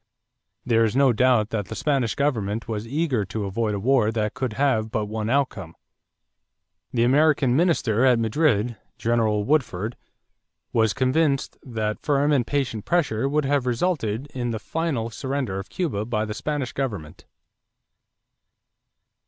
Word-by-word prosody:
There 115 -1 +3
is 110 +1 0
no 135 -2 +4
doubt 120 -2 +3
that 105 -4 -2
the - - -6
Spanish 140 -6 0
government 115 -7 -1
was 110 -1 -4
eager 140 -4 0
to 105 +2 -4
avoid 105 +2 -1
a - - -3
war 120 0 +3
that 110 -1 -1
could 130 -4 -3
have 115 -3 +1
but 110 -1 -1
one 110 +1 -3
outcome. 115 -11 -1 1.2
The 115 -2 +1
American 135 0 +3
minister 135 - +2
at 130 -2 +5
Madrid, 115 -1 +1 0.2
General 110 -3 +1
Woodford, 115 -5 0 0.8
was 110 -3 +2
convinced 140 +2 +1
that 110 -3 -3
firm 145 0 +2
and 130 -5 +2
patient 130 -7 -1
pressure 135 -8 +1
would 150 0 +1
have 140 -2 +1
resulted 125 - -1
in 120 -2 -2
the 115 - -2
final 135 -3 -2
surrender 130 -7 -3
of 95 - -8
Cuba 145 - -2
by 110 -1 -1
the 105 - -4
Spanish 135 +1 -3
government. 105 - -5
120 Hz, 145 wpm, -24 LUFS, 110-140 Hz, 1.2 s, at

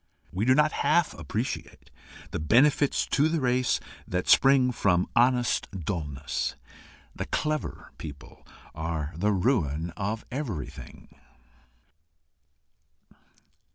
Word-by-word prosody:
We 95 +4 0
do 130 +1 +5
not 150 +1 +4
half 175 -1 +2
appreciate 85 - -5 0.4
the - - -3
benefits 135 - +3
to 150 +3 +2
the 165 0 0
race 125 -2 +1 0.3
that 90 0 -2
spring 135 -2 +5
from 90 -6 +2
honest 120 0 +2
dulness. 75 -8 -3 0.6
The - - -4
CLEVER 155 0 -3
people 70 -3 -10 0.3
are 80 -1 -3
the 100 +6 +1
ruin 85 - 0
of 105 +5 -4
everything. 120 - -7
105 Hz, 100 wpm, -27 LUFS, 80-130 Hz, 0.6 s, do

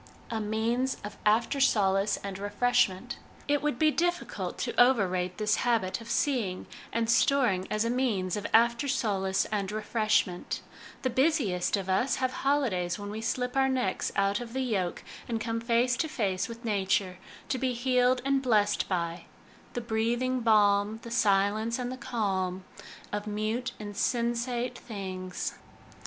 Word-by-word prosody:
A 225 -1 -1
Means 230 +5 0
of 205 0 -6
After 230 +6 +2
Solace 200 -6 +3
and 195 -1 -5
Refreshment. 205 +1 +1 0.3
It 290 0 +2
would 295 -4 -1
be 310 +2 +4
difficult 350 +2 -2
to - - -2
overrate 185 -8 +2
this 215 0 +1
habit 225 -5 0
of 230 - -10
seeing 235 -9 0 0.3
and 230 -1 0
storing 235 -6 +3
as 215 +1 0
a - - 0
means 215 -8 0
of 205 -1 -3
after 235 +4 +4
solace 195 -7 0
and 200 -2 -1
refreshment 215 -4 0 0.4
The 255 - +1
busiest 245 - +1
of 195 -1 -4
us 240 +7 +2
have 255 -1 0
holidays 240 -13 0
when 205 0 -6
we 215 +1 -5
slip 250 +3 -2
our 270 0 +3
necks 255 -8 -1
out 200 0 +2
of 235 -1 -7
the 265 - -1
yoke 195 -8 -1 0.2
and 230 -2 -1
come 230 +1 -2
face 240 +1 +2
to 320 - 0
face 200 -10 -1
with 230 +1 -9
Nature, 195 -3 0 0.3
to 260 - 0
be 255 0 0
healed 250 0 +2
and 275 0 +2
blessed 210 -5 +2
by 170 -2 -2 0.2
" - - -25
The 245 - -1
breathing 235 +3 0
balm, 210 -2 +3
The 235 - -8
silence 215 +2 +2
and 250 -1 -3
the - - -4
calm 195 -7 -2 0.5
Of 205 +1 -3
mute, 215 +4 -2
insensate 240 +3 -1
things." 185 -5 -5
225 Hz, 155 wpm, -29 LUFS, 200-250 Hz, 0.5 s, be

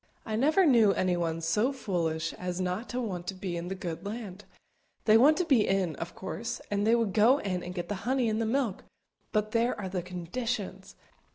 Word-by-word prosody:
I 215 - -2
never 310 - +4
knew 230 -8 +5
anyone 170 -3 0
so 210 +11 +1
foolish 165 - -2
as 180 0 -4
not 185 +5 -2
to 245 - -2
want 185 -7 -4
to 195 - -3
be 185 -2 -4
in 170 +1 -4
the 190 - -3
good 175 -3 -5
land; 205 -2 -6 0.6
they 215 - +6
want 285 +7 +6
to 360 - +1
be 265 -9 +4
in, 190 -5 +1
of 165 +1 -6
course, 225 +4 -5
and 205 +1 +1
they 230 - +5
would 225 -5 0
go 225 +5 +5
in 185 -9 -2
and 180 +1 -7
get 175 - -3
the - - -2
honey 255 +1 +1
and 220 0 0
the 225 - 0
milk, 240 -4 -1 0.5
but 215 -1 0
there 230 +1 +1
are 190 -2 -4
the 185 -1 -2
_conditions! 190 +2 -4
205 Hz, 210 wpm, -29 LUFS, 180-235 Hz, 0.6 s, they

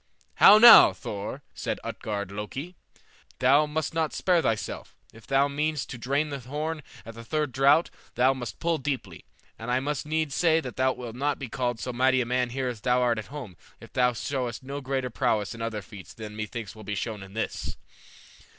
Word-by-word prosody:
"How 205 - +9
now, 235 +2 +10
Thor?" 105 +7 -6
said - - -3
Utgard 100 -2 -4
Loki; 130 - -6 0.6
"thou 140 +4 +4
must 155 +2 -3
not 160 -1 -1
spare 180 -2 +2
thyself; 110 -7 -3 0.2
if 115 0 -16
thou 135 +1 +3
meanest 150 0 -2
to 125 - -7
drain 140 +5 0
the 140 -1 -5
horn 150 +5 -4 0.2
at 115 - -9
the 115 +1 -10
third 150 +3 -1
draught 140 +6 +4 0.2
thou 130 +2 +4
must 125 -3 -7
pull 165 -1 0
deeply; 130 - -4 0.3
and 115 +2 -6
I 125 +1 +2
must 145 +1 -3
needs 155 -2 -1
say 165 0 +3
that 130 -5 -7
thou 130 0 +2
wilt 120 -2 -8
not 140 +3 -1
be 130 -4 -7
called 120 -1 -2
so 125 - -4
mighty 130 +1 +3
a 125 - 0
man 125 0 0
here 130 +1 -3
as 120 -4 -5
thou 125 +1 +2
art 120 -2 +1
at 110 - -8
home 130 -10 -8 0.2
if - - -14
thou 125 -1 +3
showest 125 -1 -3
no 140 +2 -6
greater 130 -2 -2
prowess 110 -4 0
in 115 - -9
other 110 -3 -3
feats 95 +1 -12
than 105 -1 -8
methinks 110 0 -6
will 110 - -11
be 105 0 -4
shown 105 0 -4
in 95 +1 -12
this." 110 - -4
130 Hz, 205 wpm, -27 LUFS, 115-145 Hz, 0.6 s, now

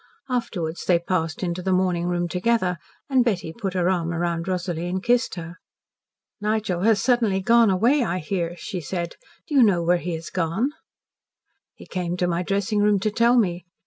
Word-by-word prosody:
Afterwards 175 -9 -2
they 175 - +4
passed 170 -2 -2
into 175 0 -2
the 190 +1 -1
morning 180 -2 +1
room 175 0 0
together, 180 -1 0 0.3
and 265 -3 +3
Betty 185 -8 -1
put 195 -3 -4
her 180 -1 +1
arm 175 -3 0
around 170 0 -2
Rosalie 175 -2 -2
and 185 +1 -3
kissed 245 -3 +2
her. 170 0 -8 0.8
"Nigel 210 -4 -1
has 215 +1 +4
suddenly 230 -5 +2
gone 230 +3 +4
away, 235 +9 +3
I 180 -5 -1
hear," 175 0 -2
she 185 0 -5
said. 170 +2 -4 0.3
"Do - - -7
you 275 - +6
know 195 -7 +4
where 175 +1 +3
he 175 -1 -3
has 160 +1 -8
gone?" 185 - 0 1.0
"He - - -13
came 180 -1 -3
to 180 - +1
my 175 0 0
dressing 200 +3 0
room 205 0 +4
to 215 +3 0
tell 235 +3 +3
me." 180 -6 +1
185 Hz, 185 wpm, -24 LUFS, 175-215 Hz, 1.0 s, you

